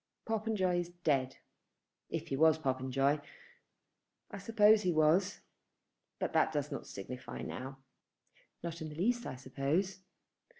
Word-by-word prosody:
"Popenjoy 215 -5 +1
is 175 0 -3
dead, 135 -4 +1 0.7
if - - -4
he - - 0
was 160 +2 +5
Popenjoy. 135 0 +1 1.1
I 200 - -5
suppose 215 0 +5
he 180 - +2
was; 160 +5 +3 0.8
but - - -2
that - - +4
does 145 -1 -2
not 140 - -5
signify 125 +6 -7
now." 135 +1 -6 0.9
"Not 170 -1 -5
in 155 - -4
the 150 - -9
least 240 +8 +1
I - - -5
suppose." 140 +9 -1
160 Hz, 130 wpm, -34 LUFS, 135-190 Hz, 1.1 s, was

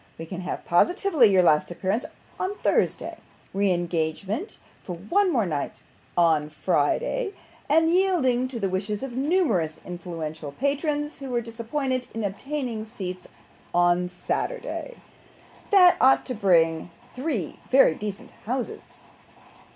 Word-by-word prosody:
'We 165 - -6
can 185 +2 -6
have 180 - -5
positively 325 - +4
your 190 -2 +5
last 150 -3 +4
appearance, 190 +6 -1 0.3
on 375 +2 -2
Thursday - - +1 0.4
re 200 0 +2
engagement 175 - -2 0.2
for 180 - -6
one 360 - +1 0.2
night 145 -4 -4 0.3
more, 175 - +6
on 155 -2 +2
Friday 470 - 0 0.3
and, 320 +2 +4
yielding 325 -9 +2
to 255 -2 -5
the 200 - 0
wishes 200 +4 -2
of 270 - -4
numerous 260 - +1
influential 165 -4 -6
patrons, 295 - -1
who 275 -1 -6
were 245 -1 +1
disappointed 245 +3 -3
in 225 - -2
obtaining 235 +2 -3
seats, 185 -5 -7 0.5
on 175 0 +3
Saturday. - - -3 0.7
That 365 -3 +7
ought 265 +1 +5
to 255 - -3
bring 170 -6 +2 0.2
three 250 - -3
very 265 -10 +6
decent 205 +3 -6 0.2
houses. 250 0 -4
220 Hz, 130 wpm, -25 LUFS, 175-290 Hz, 0.7 s, That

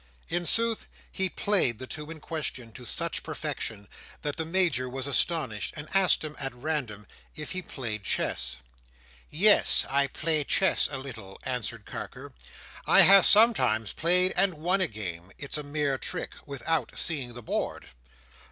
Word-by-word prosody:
In 175 0 -1
sooth, 230 -1 +2 0.2
he 190 -1 -1
played 180 - +1
the 130 - -8
two 150 +3 -6
in 165 -1 -8
question, 145 -7 -5
to 125 +2 -12
such - - -1
perfection, 100 -2 -5 0.4
that 145 -1 -3
the 160 -1 -4
Major 165 -8 +2
was 130 +1 -5
astonished, 140 - -1
and 150 +1 -7
asked 190 -4 +4
him, 150 -1 -6
at 135 -3 -4
random, 120 -7 -4 0.3
if 150 - -6
he 185 +1 -3
played 115 - -6
chess. - - -1 0.7
"Yes, 205 +8 +5
I 140 +1 +1
play 155 +2 -2
chess 190 +6 +2
a 140 - -3
little," 110 -8 -10
answered 115 -4 -4
Carker. - - -8 0.5
"I - - +7
have 195 -1 +8
sometimes 200 - +5
played, 180 +3 +3
and 195 -3 +2
won 180 +5 0
a 185 - +2
game—it's 100 - -6
a - - -3
mere 145 -2 -2
trick—without 140 -1 -4
seeing 135 -8 -2
the 120 - -9
board." - - -4
145 Hz, 150 wpm, -27 LUFS, 120-170 Hz, 0.7 s, have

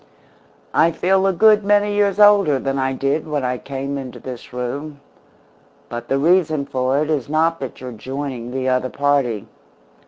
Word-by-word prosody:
I 165 - +4
feel 190 +4 +1
a - - +3
good 215 +3 +4
many 205 0 +2
years 205 -1 +1
older 205 -8 +6
than 135 +1 -2
I 135 0 0
did 140 +4 -1
when 145 -3 -2
I 125 0 -2
came 140 +1 -5
into 130 -2 -8
this 125 -2 -9
room, 140 +4 -5 0.9
but 120 0 -6
the 135 - +1
reason 155 -1 +2
for 130 -1 -1
it 155 - -3
is 140 -4 -1
not 165 +2 +1
that 135 - -7
you're 130 -1 -6
joining 130 +1 -6
the 130 +1 -3
other 130 0 +1
party. 140 -7 0
140 Hz, 175 wpm, -20 LUFS, 130-165 Hz, 0.9 s, older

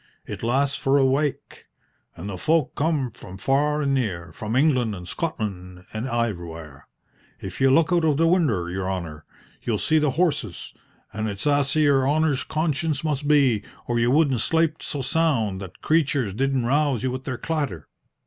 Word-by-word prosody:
It - - -7
lasts 135 +4 +1
for 135 +1 +2
a 135 - +4
wake, 140 +2 -1 0.5
and 85 - -7
the 100 -2 -5
folk 155 - +1
come 145 -5 0
from 95 0 -11
far 145 +7 +1
an' 140 -1 +1
near 90 -11 -2
from 110 +5 -4
England 130 -6 +2
an' 90 -2 -9
Scotland 90 - -5
an' 110 +2 -3
iverywhere. 85 - -4 0.5
If 95 +3 -7
you 135 - +5
look 160 +5 +4
out 170 -1 +3
of 155 -3 +2
the 165 - +3
winder, 155 - +2
your 95 +1 -3
honour, 85 -5 -5 0.4
you'll 115 -3 -1
see 155 +8 +2
the 150 -1 +2
horses, 145 - -1 0.4
and 110 +1 -2
it's 100 +4 -5
asy 145 +1 +2
your 140 -2 +3
honour's 150 -2 +1
conscience 155 -2 -1
must 150 -2 -1
be, 135 -8 +4 0.2
or 120 -1 0
you 120 +1 +2
wouldn't 140 -3 +3
slape 160 +2 +1
so 145 -3 -4
sound 125 -10 0
that 95 -2 -8
the - - -23
creatures 140 - +2
didn't 135 +2 0
rouse 140 -1 +1
you 130 - 0
with 130 +1 -6
their 130 -2 -3
clatter." 140 - -3
135 Hz, 180 wpm, -24 LUFS, 105-150 Hz, 0.5 s, you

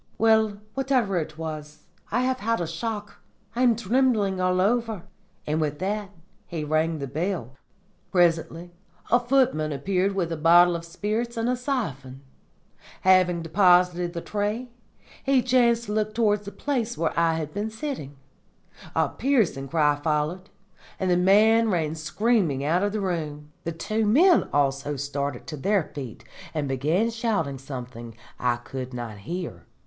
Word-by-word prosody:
Well, 220 -2 +3 0.2
whatever 255 -8 +1
it 155 -1 -6
was, 155 -1 -7 0.3
I 245 - +1
have 255 0 0
had 230 +2 0
a 170 - -1
shock. 205 +6 -5 0.3
I 245 - -1
am 245 -3 +5
trembling 215 -4 +1
all 185 0 +2
over.' 220 -1 +1 0.4
And 155 +1 0
with 150 -1 -1
that 200 +4 -2 0.4
he 165 -3 -4
rang 155 +2 +1
the 140 - -4
bell. 150 - -3 0.6
"Presently 170 -1 +1 0.4
a 240 - +6
footman 240 - +2
appeared 185 +7 0
with 175 -4 -1
a 165 - -2
bottle 170 +2 +6
of 170 0 -5
spirits 215 +7 -3
and 225 +1 0
a 250 - +2
siphon. 145 - -4 0.8
Having 185 -2 +4
deposited 180 0 +3
the 170 - -4
tray, 215 +6 -3 0.5
he 270 -2 +3
chanced 240 -2 +3
to 210 - -6
look 215 0 -1
towards 210 -3 +2
the 200 - -6
place 240 -4 -2
where 165 - 0
I 165 -2 +1
was 215 +2 -4
sitting. 235 - -5 0.8
A - - +3
piercing 220 - 0
cry 150 0 +2
followed, 155 +5 -1 0.5
and 185 -1 +1
the - - +4
man 215 +5 +5
ran 160 -5 0
screaming 160 - 0
out 165 +5 +2
of 205 0 +1
the 215 0 -2
room. 150 -5 -3
The 170 - -1
two 215 +7 -1
men 335 - +5
also 140 0 0
started 140 -1 -3
to 155 - -6
their 195 +5 +1
feet 130 -6 -7 0.3
and 150 -2 -1
began 155 - +1
shouting 205 - -1
something 125 -4 -8 0.2
I 125 -1 +2
could 125 +1 -7
not 115 -4 -6
hear. 155 - -6
180 Hz, 155 wpm, -25 LUFS, 150-220 Hz, 0.8 s, a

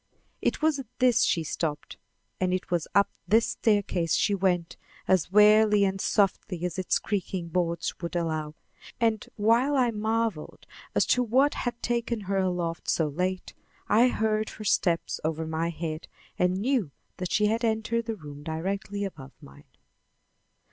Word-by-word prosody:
It - - -1
was 310 -3 +2
at 265 - -7
this 250 -2 +4
she 165 - +1
stopped 150 -1 -4 0.4
and 185 0 +1
it 185 - -6
was 170 -3 0
up 200 0 +4 0.2
this 225 +5 +3
staircase 200 -7 +1
she 205 - +2
went 180 -3 0 0.3
as 185 -2 +2
warily 210 0 +6
and 190 0 -1
softly 190 -3 0
as 180 +1 -3
its 185 - +1
creaking 185 -4 -3
boards 170 -1 -1
would 170 0 -5
allow; 155 -3 -2 0.4
and 225 -2 +1
while 235 +7 +3
I 250 -3 +3
marveled 220 -5 -2 0.3
as - - +3
to 250 - +2
what 260 +5 +3
had 240 -1 -3
taken 235 -1 -1
her 195 0 -2
aloft 175 -3 -2
so 160 -2 +1
late, 180 +5 -3 0.3
I 235 +4 +5
heard 220 -2 0
her 215 - -9
steps 175 -4 +1
over 160 +1 -2
my 160 +1 -1
head 160 -1 -5 0.3
and 180 0 +2
knew 235 - 0 0.3
that 180 -3 -4
she 210 - +3
had 225 +3 0
entered 225 +1 0
the 225 -1 -3
room 145 -6 -10
directly 195 +6 -3
above 135 -9 -9
mine. 70 +1 -15
195 Hz, 160 wpm, -27 LUFS, 170-220 Hz, 0.4 s, warily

